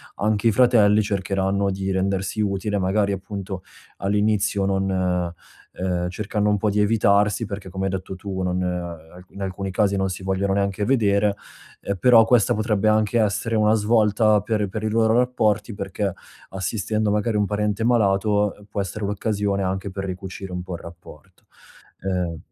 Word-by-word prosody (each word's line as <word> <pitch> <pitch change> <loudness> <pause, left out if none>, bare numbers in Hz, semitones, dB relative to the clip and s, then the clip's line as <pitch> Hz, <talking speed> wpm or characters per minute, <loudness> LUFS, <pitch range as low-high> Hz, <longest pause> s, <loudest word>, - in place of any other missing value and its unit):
anche 105 +1 +1
i - - +5
fratelli 110 -3 +5
cercheranno 100 -1 0
di 95 0 -3
rendersi 95 +1 -1
utili. 100 0 -1
Magari 100 +2 +1
appunto, 95 -1 -6 0.4
all'inizio 105 0 +1
non 95 0 0 0.8
ehm, 90 -1 -2
cercando 105 +2 -1
un 105 - +2
po' 105 +1 0
di 105 - 0
evitarsi, 105 +1 +2
perché 100 -2 -7
come 95 +1 -3
hai 95 - -1
detto 95 0 -5
tu 95 -1 -5
non 90 0 -1
ehm, 90 -2 -3 0.3
n - - -27
in 100 - -8
alcuni 95 0 -4
casi 100 +1 +1
non 95 0 0
si 95 +1 -6
vogliono 95 +1 0
neanche 100 +1 0
vedere. 105 -5 +2 0.5
Ehm, 100 - -2
però 115 +1 +6
questa 120 0 +3
potrebbe 110 -1 0
anche 110 +2 +2
essere 110 +2 0
una 105 0 +3
svolta 110 -1 +3
per 105 -1 -1
per 110 +2 -5
i 110 - 0
loro 110 0 +2
rapporti, 120 -3 +1
perché, 100 0 -3 0.4
assistendo 105 +3 -2
magari, 105 +1 0
un 105 - +2
parente 105 +1 -1
malato. 105 -3 +2 0.2
può 100 - -2
essere 100 +2 -4
l'occasione 100 -1 -1
anche 95 +1 -3
per 95 +1 -5
ricucire 95 +1 -6
un 90 - -3
po' 90 0 -7
il - - -9
rapporto. 85 0 -14 0.6
Ehm, 90 -3 -2
100 Hz, 170 wpm, -23 LUFS, 95-105 Hz, 0.8 s, però